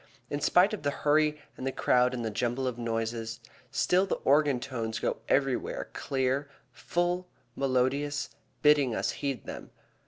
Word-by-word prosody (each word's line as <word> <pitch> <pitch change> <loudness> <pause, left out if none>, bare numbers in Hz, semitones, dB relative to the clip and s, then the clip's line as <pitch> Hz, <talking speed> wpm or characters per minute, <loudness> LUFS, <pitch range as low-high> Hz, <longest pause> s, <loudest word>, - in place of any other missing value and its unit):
In 145 - -2
spite 180 +8 +4
of 215 - -4
the 145 - 0 0.2
hurry 150 0 +3 0.2
and 130 - -5
the - - 0
crowd 125 -1 +2
and 120 -2 -3
the 110 - -2
jumble 120 +4 -1
of 125 -2 -2
noises, 115 0 -2 0.3
still 180 +7 +2
the - - 0
organ 145 -2 +4
tones 115 -4 -3
go - - -1
everywhere 135 -2 0
clear, 135 +1 -1 0.2
full, 175 +1 -1 0.3
melodious, 135 +2 0 0.3
bidding 145 -5 +5
us - - 0
heed 140 -4 -2
them. - - -7
135 Hz, 155 wpm, -29 LUFS, 120-145 Hz, 0.3 s, bidding